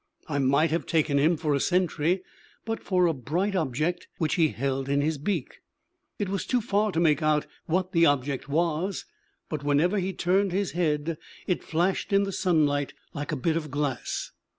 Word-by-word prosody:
I 145 -2 -1
might 140 +4 +3
have 165 - -1
taken 155 -3 +2
him 160 +4 +3
for 150 -1 0
a 140 - +2
sentry 180 +1 +1 0.4
but 225 0 -3
for 180 -2 +2
a 165 - +3
bright 170 - -1
object 160 +2 -1
which 155 -2 0
he 165 -3 +4
held 135 +2 -2
in 140 0 +2
his 150 0 0
beak. 165 -2 -3 0.6
It 205 - -1
was 195 0 -3
too 250 - +2
far 210 -1 +1
to 165 - +1
make 160 -2 +3
out 150 -1 +2 0.2
what 185 +3 0
the 165 -3 +5
object 140 -1 0
was; 170 +5 0 0.4
but 150 -2 -4
whenever 155 +8 +2
he 190 +1 -1
turned 190 +1 +1
his 195 -4 0
head 155 -1 -1 0.3
it 180 - -1
flashed 175 +6 0
in 200 0 +4
the 200 - -2
sunlight 150 -7 +1 0.2
like 145 +1 -4
a - - 0
bit 160 +4 0
of 155 -2 -2
glass. 145 -3 -2
160 Hz, 190 wpm, -27 LUFS, 145-185 Hz, 0.6 s, the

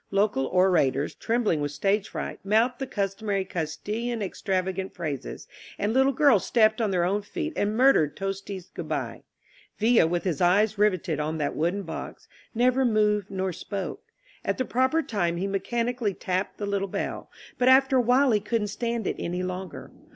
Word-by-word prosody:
Local 200 -9 +1
orators, 165 -7 +2
trembling 225 -9 0
with 145 -1 -2
stage 195 +7 0
fright, - - -5
mouthed 220 +5 +2
the 270 - -3
customary 200 -1 -2
Castilian 210 +8 -3
ex 190 - -7
travagant 190 -1 -1
phrases, 150 -6 -5 0.3
and 210 +2 -1
little 265 +2 +4
girls 265 - +4
stepped 220 -1 +3
on 220 - +1
their 180 -3 +1
own 195 +4 +1
feet 315 - -4
and 210 +2 0
murdered 235 - +4
Tosti's 195 -1 -5
"Good - - -7
bye." - - -3 0.6
Villa, 225 -5 +4
with 175 +1 -1
his 175 -7 -2
eyes 200 +4 +3
riveted 185 -7 +1
on 155 +1 -2
that 145 -2 -2
wooden 175 +6 0
box, 165 - -7 0.3
never 250 +3 +3
moved 210 -4 +2
nor 190 -1 -2
spoke. 200 - -5 0.4
At - - -1
the 255 - -1
proper 260 +8 +1
time 175 -9 -1
he 185 - -2
mechanically 230 +2 -1
tapped 185 +2 -2
the 205 - -3
little 200 -1 -1
bell, - - -4 0.3
but 250 - +3
after 265 0 +5
a - - +5
while 250 +3 +4
he 215 - +3
couldn't 210 0 -1
stand 235 +1 -2
it - - -2
any 180 +1 -3
longer. 185 +1 -6
200 Hz, 175 wpm, -26 LUFS, 185-230 Hz, 0.6 s, after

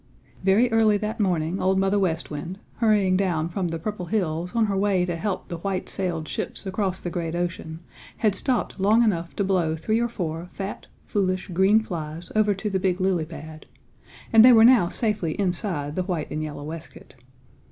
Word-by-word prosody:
Very 210 +6 +4
early 220 -2 +4
that 215 +2 -4
morning 180 -3 0
Old 190 +1 +2
Mother 195 +1 +2
West 170 -5 -1
Wind, 165 +5 -5 0.2
hurrying 210 -5 +3
down 175 -4 0
from 180 0 -2
the 165 0 -3
Purple 180 +1 -5
Hills 180 -3 -2
on 230 -1 +3
her 200 -2 -1
way 195 -2 +2
to 175 -1 -2
help 195 +3 -3
the 170 - -5
white 190 +1 -3
sailed 170 -5 -2
ships - - -4
across 190 -1 -1
the 175 - -5
great 165 -1 -3
ocean, 170 -2 -4 0.4
had 215 -3 +2
stopped 240 +1 -1
long 215 +5 +4
enough 170 -6 -1
to 200 - 0
blow 180 -5 +1
three 215 +8 0
or 235 0 0
four 170 -5 -4
fat, 195 +1 -6 0.2
foolish, 185 -2 -1
green 190 +5 +4
flies 165 -3 -6
over 210 -1 +3
to 195 +3 -4
the 195 -2 0
big 185 -1 0
lily 185 -4 +1
pad, 155 -1 -10 0.7
and 225 0 +9
they 250 - +9
were 225 -1 +7
now 235 -8 +6
safely 205 -8 -1
inside 175 -6 -2
the 185 - 0
white 175 -4 -3
and 155 - -2
yellow 150 -2 -5
waistcoat. 160 -1 -9
185 Hz, 195 wpm, -24 LUFS, 165-205 Hz, 0.7 s, and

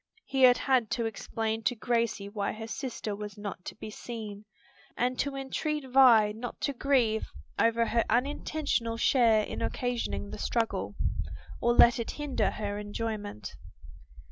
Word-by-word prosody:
He 270 -1 -1
had 250 -1 +8
had 255 -5 +2
to 235 - -1
explain 225 +1 -2
to 245 - +2
Gracie 230 -3 0
why 200 -1 -2
her 220 +1 -7
sister 225 -3 -4
was 210 0 -7
not 200 -3 -6
to - - -6
be 215 - -8
seen, 215 -2 -7 0.5
and 250 +1 0
to 280 -1 -1
entreat 275 +2 -2
Vi 245 -5 +6
not 225 +3 -7
to 280 - 0
grieve 245 -5 +2 0.3
over 230 0 +3
her 230 0 +2
unintentional 250 -1 0
share 230 -3 +4
in - - -5
occasioning 245 -4 -2
the - - -7
struggle, 230 -2 -1 0.7
or 240 - +3
let 240 0 +7
it 230 - -3
hinder 295 -3 0
her 205 -1 -4
enjoyment. 205 - -5
230 Hz, 150 wpm, -29 LUFS, 215-250 Hz, 0.7 s, had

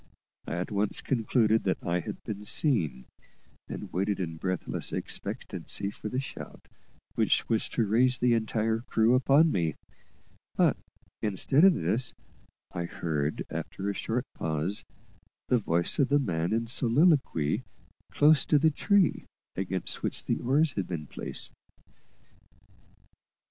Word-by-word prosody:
I - - -3
at 90 +4 -3
once 100 0 0
concluded 110 -3 +2
that 95 - +1
I 85 +1 0
had - - -7
been 105 -1 -5
seen, 105 - +1 0.6
and - - -7
waited 100 +3 0
in 80 -3 -3
breathless 90 +1 -2
expectancy 100 0 -4
for 105 - -7
the 130 - -1
shout 135 - -8 0.5
which - - +2
was 110 -2 0
to 115 - 0
raise 125 +5 +3
the 125 -1 +3
entire 110 0 0
crew 115 0 +2
upon 140 +5 +5
me; 85 -5 0 0.8
but, - - +4 0.5
instead 110 - +2
of 190 -2 +7
this, 120 +1 0 0.6
I 85 - -3
heard, 75 -3 -2
after 100 +1 -3
a - - -4
short 120 +5 -2
pause, 80 +5 -2 0.7
the 125 - +4
voice 85 -4 0
of 140 - +3
the 145 - +4
man 85 - -1
in 115 +1 +1
soliloquy 125 - +2 0.5
close 150 0 +5
to 150 - +5
the 160 +2 +4
tree 195 +3 +2 0.3
against 95 -1 -3
which - - -3
the - - 0
oars 145 +5 +2
had 100 -5 -2
been 80 -4 -4
placed. - - -6
110 Hz, 140 wpm, -28 LUFS, 90-130 Hz, 0.8 s, of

